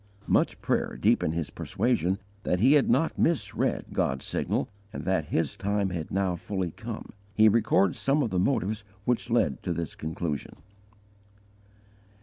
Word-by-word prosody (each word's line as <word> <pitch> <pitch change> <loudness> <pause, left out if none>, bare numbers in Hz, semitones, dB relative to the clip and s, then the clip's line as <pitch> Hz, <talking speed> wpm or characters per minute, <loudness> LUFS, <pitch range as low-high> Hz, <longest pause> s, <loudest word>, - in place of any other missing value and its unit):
Much - - +2
prayer - - 0
deepened 80 - +2
his 85 -4 -2
persuasion 100 -7 0 0.2
that 90 -3 0
he 130 +8 +6
had 145 -2 +4
not 165 - +2
misread 170 -3 +1
God's 65 0 0
signal, - - -1 0.2
and - - -6
that 95 -5 +1
His 80 +2 -1
time 100 -1 0
had 85 -3 -4
now 95 -2 0
fully 95 0 -3
come. - - -7 0.2
He 110 0 +6
records 110 -4 +3
some 140 +2 +2
of 115 - -2
the 90 - +1
motives 110 -1 0 0.2
which 120 0 0
led 110 - +1
to 90 - -2
this 85 -1 -4
conclusion. 80 -1 -4
95 Hz, 150 wpm, -28 LUFS, 85-115 Hz, 0.2 s, he